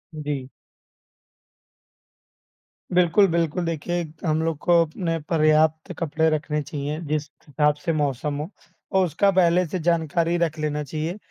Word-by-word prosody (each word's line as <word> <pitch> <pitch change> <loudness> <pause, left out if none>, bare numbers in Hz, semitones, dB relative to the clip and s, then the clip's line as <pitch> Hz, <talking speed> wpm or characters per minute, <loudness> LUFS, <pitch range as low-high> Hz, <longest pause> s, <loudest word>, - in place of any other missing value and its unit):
जी। 145 -3 -4 2.5
बिल्कुल, 180 +3 +5
बिल्कुल। 170 0 0
देखिए, 170 +2 -2 0.2
हम 155 -1 +1
लोग 165 -2 -1
को 170 +3 +4
अपने 165 +1 -3
पर्याप्त 155 -1 +3
कपड़े 160 0 +1
रखने 150 -1 -1
चाहिए, 145 +1 -4
जिस 150 0 -1 0.2
हिसाब 150 +1 +2
से 165 - +1
मौसम 145 -1 -1
हो 155 - -5 0.4
और 190 -1 +3
उसका 195 +5 +2
पहले 180 -1 +3
से 185 - -3
जानकारी 170 0 +1
रख 165 -2 -1
लेना 150 -1 -1
चाहिए। 155 +6 -4
160 Hz, 135 wpm, -24 LUFS, 150-170 Hz, 2.5 s, बिल्कुल